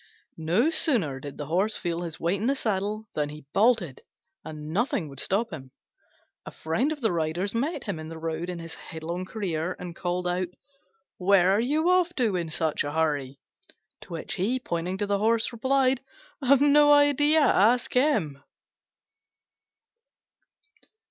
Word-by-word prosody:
No 180 - +2
sooner 230 - +1
did 140 0 -9
the 145 - -5
Horse 190 +8 0
feel 170 -1 -3
his 170 -2 -6
weight 180 +4 0
in 225 - 0
the 275 - +2
saddle 215 -2 -2
than 150 -1 -1
he 150 -1 -10
bolted, 205 - +2 0.4
and 155 0 -7
nothing 205 - 0
would 135 -1 -9
stop 200 +5 0
him. 135 -4 -8 0.7
A - - -8
friend 225 - -1
of 300 -2 -5
the 225 - +1
Rider's 170 +4 -1
met 275 +4 -2
him 200 -7 -4
in 155 0 -7
the 165 - -8
road 165 +2 -4
in 180 - -4
his 165 -1 -8
headlong 170 +3 -6
career, 180 -4 -3
and 175 -1 -8
called 180 0 -2
out, 180 +1 -1 0.7
"Where 190 -1 +4
are 200 - +3
you 300 +7 +1
off 360 -1 +2
to 225 -7 +1
in 170 -2 -2
such 160 -1 0
a 145 - -4
hurry?" 145 -4 -1 0.6
To - - -10
which 165 +5 -4
he, 210 +6 0
pointing 180 -4 -3
to 205 - -1
the 200 0 0
Horse, 225 +2 +2
replied, 260 +2 +1 0.4
"I've 275 0 +4
no 290 0 +6
idea: 290 +2 +5
ask 240 -2 +3
him." 215 - +1
190 Hz, 165 wpm, -26 LUFS, 160-245 Hz, 0.7 s, no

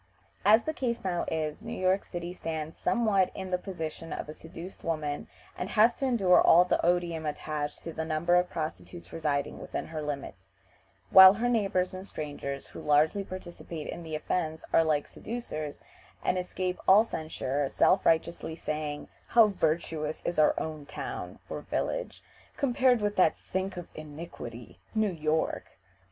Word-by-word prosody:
As 220 +3 +6
the 315 - -2
case 240 -5 -2
now 180 -2 -1
is, 155 +2 -2
New 230 +1 -6
York 185 +1 +2
City 175 0 -6
stands 160 -2 -4
somewhat 215 -6 +2
in 190 -1 -5
the 180 - +1
position 165 -3 -6
of - - -4
a 150 - -7
seduced 165 +4 -10
woman, 150 -3 -2 0.3
and 180 - -4
has 225 +2 +5
to 275 - -1
endure 195 -8 +5
all 175 +2 +7
the - - +1
odium 175 -2 +1
attached 150 0 -4
to 165 - -6
the 160 - -3
number 160 +2 0
of 180 0 +4
prostitutes 165 +2 -6
residing 145 -3 -1
within - - -4
her 155 -1 -4
limits; 135 -10 -6 0.6
while 190 +1 +11
her 235 +4 0
neighbors 195 -6 +1
and 185 +1 -7
strangers 145 -4 -5
who - - -10
largely 155 +7 +3
participate 175 -4 -7
in - - -5
the 160 -2 -5
offense 160 0 -2
are 165 - +6
like 150 -2 +1
seducers, 155 -11 -6 0.4
and - - +2
escape 180 0 -3
all 200 +3 +8
censure, 145 - -2
self 185 - +3
righteously 165 0 +1
saying, 150 -2 -4 0.2
"How 230 -2 +6
virtuous 160 -4 -1
is 170 - -1
our 155 - +5 0.3
town - - -6
(or - - -5
village) - - -3 0.3
compared 255 -3 +3
with 205 0 -1
that 180 -4 +4
sink 190 0 -3
of 175 - -6
iniquity, 150 -6 -9 0.2
New 215 -2 +2
York." 155 -1 -1
170 Hz, 160 wpm, -29 LUFS, 155-190 Hz, 0.6 s, while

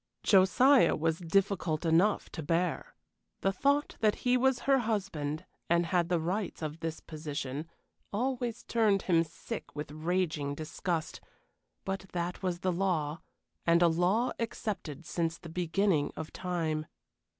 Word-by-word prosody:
Josiah 245 +8 +5
was 160 +1 0
difficult 180 -2 +1
enough 170 +6 +3
to 160 - -5
bear. 165 0 -1 0.5
The 195 - +2
thought 280 +8 +1
that 215 -2 +3
he 250 0 +4
was 255 -1 +2
her 275 +1 +4
husband, 190 -10 -2 0.2
and 170 0 +3
had 175 0 +1
the 175 -2 +2
rights 180 +2 -2
of 155 +1 -4
this 165 -1 -4
position, 150 -1 -5 0.4
always 245 +1 -2
turned 215 -4 +2
him 165 -3 +3
sick 160 -2 -8
with 150 0 -5
raging 155 -3 -1
disgust; 160 +1 -3 0.6
but 190 0 -3
that 175 0 -2
was 180 -2 -2
the 185 - +1
law, 170 -4 0 0.4
and 170 +1 +4
a - - +7
law 180 +9 +2
accepted 190 - -4
since 165 0 -1
the 170 - -10
beginning 175 -1 +1
of 160 0 -6
time. 160 -4 -2
175 Hz, 140 wpm, -31 LUFS, 160-200 Hz, 0.6 s, a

